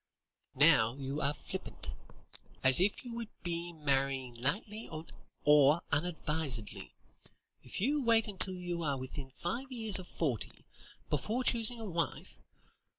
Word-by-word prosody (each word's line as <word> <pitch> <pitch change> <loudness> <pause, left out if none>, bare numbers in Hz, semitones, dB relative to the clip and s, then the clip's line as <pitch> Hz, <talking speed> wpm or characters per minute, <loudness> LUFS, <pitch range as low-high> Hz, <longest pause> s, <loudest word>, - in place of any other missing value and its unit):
"Now, 130 -5 +5
you 140 +2 -4
are 145 +2 +1
flippant. - - -5 0.7
As 130 +4 +9
if 205 +6 +1
you 240 - -7
would 230 -2 -5
be 170 0 -3
marrying 135 -4 -1
lightly 200 - -3 0.5
or 150 +2 +5
unadvisedly, 150 - -2 0.7
if 125 - -5
you 285 +8 +1
wait 230 -2 +4
until 190 -2 -1
you 175 -1 -4
are 145 -4 -1
within 130 +1 -6
five 245 +10 -3
years 220 -6 +3
of 180 - -9
forty, 140 - -3 0.5
before 215 - -1
choosing 235 -1 +4
a 225 - -6
wife. 170 -4 -3
165 Hz, 130 wpm, -33 LUFS, 140-210 Hz, 0.7 s, As